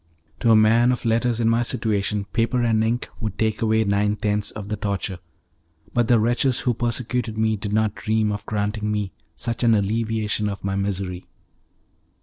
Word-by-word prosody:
To 115 - +2
a 110 - +7
man 115 +3 +5
of 125 - -3
letters 115 +1 +1
in 115 - +2
my 115 +1 +3
situation, 105 -3 0
paper 120 +1 +1
and 110 -2 +2
ink 115 +2 -1
would 110 -2 -4
take 110 -1 0
away 110 0 +3
nine 105 0 +1
tenths 105 -1 -1
of 105 -2 -8
the 105 - -2
torture, 100 -3 -3 0.7
but 120 -1 +2
the 120 -2 +5
wretches 120 +3 +2
who 125 - +1
persecuted 120 -1 -2
me 110 0 +2
did 105 0 -5
not 110 0 +1
dream 110 -1 0
of 105 0 -4
granting 105 0 -1
me 105 -2 -2 0.2
such 115 0 -3
an 115 -2 +5
alleviation 105 0 0
of 100 - -6
my 95 0 -1
misery. 95 -2 -3
110 Hz, 180 wpm, -23 LUFS, 105-115 Hz, 0.7 s, a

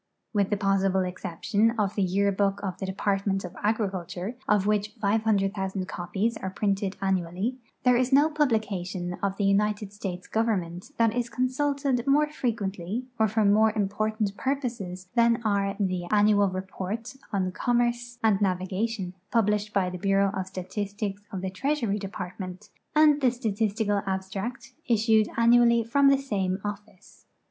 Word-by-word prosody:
With 200 -2 +2
the 205 - +1
possible 195 -1 +2
exception 185 +5 0
of 205 -2 +1
the 205 - -1
Yearbook 200 +1 +1
of 185 -3 -4
the 190 - -3
Department 195 0 0
of 180 - -9
Agriculture, 195 -1 -2
of 205 -5 +3
which 210 +1 0
500,000 200 -3 0
copies 195 +7 -2
are 190 - -4
printed 195 0 -1
annually, 190 +6 -1 0.2
there 250 -1 +5
is 250 +1 +1
no 285 +3 +6
publication 205 - -1
of 195 -1 -1
the 205 - -1
United 205 0 +1
States 185 -3 -5
Government 190 -5 -1
that 230 -1 +3
is 240 -1 -1
consulted 260 +1 0
more 295 +2 +4
fre 300 -4 -3
quently 205 0 -2 0.2
or 220 - +4
for 215 +1 +1
more 215 +2 +5
important 210 0 -1
purposes 230 -10 -3
than 235 0 +4
are 200 -1 +1
the 185 -3 -1
Annual 205 +1 +4
Report 190 +5 -5 0.2
on 185 -2 0
Commerce 240 +2 0
and 215 -2 +3
Navigation, 190 +1 -1 0.2
published 210 -2 +1
by 185 -3 +1
the 180 - -6
Bureau 195 +1 +2
of 190 -2 -3
Statistics 200 +2 -4
of 190 - -4
the 190 0 -3
Treasury 230 -1 -1
Department, 190 0 -7 0.3
and 300 -1 +5
the 260 - +5
Statistical 215 -3 0
Abstract, 195 +6 -4
issued 220 -2 +3
annually 235 0 +5
from 275 +5 +3
the 275 0 +6
same 195 -9 -1
office. 205 -2 -9
205 Hz, 150 wpm, -27 LUFS, 190-230 Hz, 0.3 s, no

